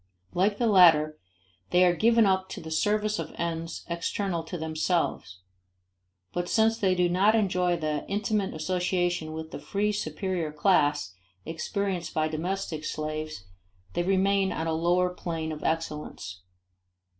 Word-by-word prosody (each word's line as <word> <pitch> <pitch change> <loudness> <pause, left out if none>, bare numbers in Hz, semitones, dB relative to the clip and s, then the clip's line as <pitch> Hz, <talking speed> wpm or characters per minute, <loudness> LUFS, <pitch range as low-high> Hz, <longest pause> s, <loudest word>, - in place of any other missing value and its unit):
Like 200 +3 +2
the 240 - +1
latter 160 -7 +5 0.5
they 180 +1 +4
are 175 -1 +3
given 230 +3 +4
up 190 -1 +1
to - - -6
the 160 -1 -8
service 210 +5 +1
of - - -6
ends 165 0 -4
external 170 +1 -2
to 175 - -5
themselves; 160 - -1 0.9
but 175 0 -2
since 225 0 +3
they 190 -2 +2
do 180 -1 +3
not 195 +5 +3
enjoy 180 -4 +1
the 155 -2 -2
intimate 205 -1 -1
association 175 0 -1
with 160 0 -6
the - - -6
free 200 +8 -1
superior 180 -3 -2
class 150 - +2 0.3
experienced 175 +1 -3
by 155 0 +2
domestic 160 0 -3
slaves 155 -5 -4 0.5
they - - 0
remain 195 +1 +2
on 160 - -2
a 165 - 0
lower 175 +3 +2
plane 165 -3 -4
of 155 - -7
excellence. 150 - -3
175 Hz, 145 wpm, -27 LUFS, 155-195 Hz, 0.9 s, latter